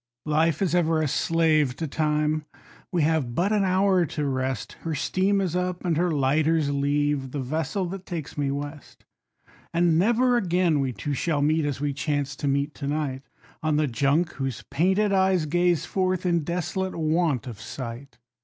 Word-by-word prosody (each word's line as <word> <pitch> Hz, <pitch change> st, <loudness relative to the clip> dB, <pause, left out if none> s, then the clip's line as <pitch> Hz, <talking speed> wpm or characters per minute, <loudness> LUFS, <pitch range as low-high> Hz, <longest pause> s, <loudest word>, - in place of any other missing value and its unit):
Life 155 Hz, +3 st, +2 dB
is 175 Hz, -4 st, 0 dB
ever 165 Hz, -2 st, +2 dB
a 155 Hz, -, +1 dB
slave 155 Hz, -2 st, +2 dB
to 160 Hz, -, -3 dB
Time; 150 Hz, +1 st, 0 dB, 0.5 s
we 175 Hz, -4 st, +1 dB
have 150 Hz, -6 st, 0 dB
but 185 Hz, +7 st, +1 dB
an 210 Hz, -2 st, +2 dB
hour 190 Hz, -1 st, +3 dB
to 150 Hz, +1 st, -3 dB
rest, 130 Hz, -3 st, -2 dB
Her 165 Hz, -2 st, -3 dB
steam 190 Hz, +7 st, +1 dB
is 180 Hz, -3 st, -1 dB
up 180 Hz, 0 st, -2 dB
and 170 Hz, -2 st, +1 dB
her 175 Hz, +3 st, +1 dB
lighters 150 Hz, +1 st, +2 dB
leave, 145 Hz, -1 st, 0 dB
the 145 Hz, -, -4 dB
vessel 155 Hz, +8 st, -2 dB
that 190 Hz, 0 st, -7 dB
takes 165 Hz, -5 st, -5 dB
me 145 Hz, -2 st, -1 dB
west; 145 Hz, +1 st, -6 dB, 0.7 s
And 170 Hz, -1 st, +3 dB
never 240 Hz, +5 st, +3 dB
again 175 Hz, -6 st, +2 dB
we 135 Hz, -2 st, 0 dB
two 125 Hz, +6 st, -4 dB
shall 145 Hz, 0 st, 0 dB
meet, 155 Hz, +1 st, +2 dB
as 145 Hz, -2 st, -2 dB
we 145 Hz, 0 st, -1 dB
chance 145 Hz, -1 st, -2 dB
to 145 Hz, -, -3 dB
meet 140 Hz, +2 st, 0 dB
to 140 Hz, -, -6 dB
night, 145 Hz, -3 st, -2 dB, 0.4 s
On 155 Hz, -2 st, +1 dB
the 150 Hz, +1 st, +2 dB
Junk, 145 Hz, +6 st, +1 dB
whose 135 Hz, -3 st, -4 dB
painted 190 Hz, +7 st, +2 dB
eyes 190 Hz, -3 st, +3 dB
gaze 175 Hz, +1 st, +1 dB
forth, 185 Hz, -1 st, -1 dB
in 170 Hz, -1 st, +2 dB
desolate 180 Hz, +3 st, -2 dB
want 160 Hz, -5 st, +1 dB
of 115 Hz, -5 st, -8 dB
sight. 125 Hz, +4 st, -7 dB
155 Hz, 180 wpm, -25 LUFS, 140-175 Hz, 0.7 s, hour